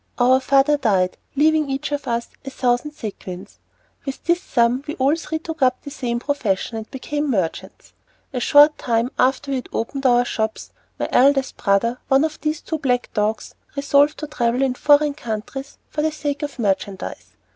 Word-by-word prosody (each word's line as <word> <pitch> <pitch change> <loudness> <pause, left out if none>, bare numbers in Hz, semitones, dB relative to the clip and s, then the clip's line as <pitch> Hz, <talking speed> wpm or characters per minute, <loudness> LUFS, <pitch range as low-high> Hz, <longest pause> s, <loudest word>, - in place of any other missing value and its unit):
Our 255 +1 +5
father 275 +2 +3
died, 190 -8 +1 0.2
leaving 310 +2 +3
us - - -9
each 270 +1 -3
a 290 - 0
thousand 245 +2 -2
sequins. 195 -5 -8 0.4
With 270 -1 -6
this 345 +1 +1
sum 240 -1 +1
we 300 - -4
all 275 +3 +2
three 325 -1 -4
took 320 -1 -7
up 255 -1 +2
the 285 - -8
same 245 -4 -2
profession, 235 -7 -1
and 220 0 -7
became 290 +3 -3
merchants. 190 -9 -3 0.4
A 250 - -1
short 290 +4 +6
time 235 +1 0
after 265 +2 +2
we 270 - +1
had 250 - -7
opened 270 +4 -1
our 245 0 +4
shops, 220 -2 -3 0.3
my - - -2
eldest 270 +1 +3
brother, 230 +4 +1
one 270 +2 +4
of 315 -1 -5
these 305 0 -1
two 320 -2 -4 0.3
dogs, 215 0 -1 0.2
resolved 285 +1 +3
to 305 - -5
travel 245 -3 0
in 265 -2 +1
foreign 290 +2 +4
countries 245 +2 -6
for 300 - -3
the 315 +1 +1
sake 290 -1 -3
of 290 -2 -5
merchandise. 200 -3 -3
270 Hz, 175 wpm, -21 LUFS, 235-290 Hz, 0.4 s, short